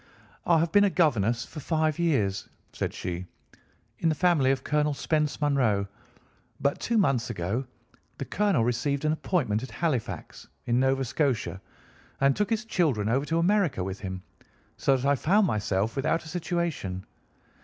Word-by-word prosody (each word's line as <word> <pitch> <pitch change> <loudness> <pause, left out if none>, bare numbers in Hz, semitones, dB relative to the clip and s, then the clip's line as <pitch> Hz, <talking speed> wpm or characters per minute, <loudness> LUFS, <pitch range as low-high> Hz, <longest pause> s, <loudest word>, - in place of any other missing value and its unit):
"I 170 - +5
have 165 +1 +1
been 205 +2 +6
a - - +3
governess 120 - +1
for 155 - -9
five 155 +1 0
years," 110 - 0 0.2
said - - -2
she, 90 +1 -5 0.7
"in 165 - +2
the 155 - +1
family 170 -6 +3
of 135 0 0
Colonel 150 0 +1
Spence 150 +1 0
Munro, 125 -9 +2 0.7
but 140 0 0
two 235 - 0
months 135 - +2
ago 105 +4 -2 0.5
the - - -4
colonel 205 - +1
received 135 +5 0
an 155 - +3
appointment 140 - 0
at 130 - -7
Halifax, 150 -10 -3 0.2
in 120 +1 +2
Nova 135 0 +2
Scotia, 125 -7 -1 0.6
and 140 0 +3
took 210 - 0
his 225 0 -1
children 145 - +1
over 135 +5 +1
to 165 - 0
America 175 - +2
with 95 +1 -5
him, 95 -2 -6 0.5
so 135 - +2
that 130 - -4
I 140 - +4
found 190 - +3
myself 105 - 0
without 155 +4 0
a - - -9
situation. 165 - -3
140 Hz, 165 wpm, -27 LUFS, 115-165 Hz, 0.7 s, been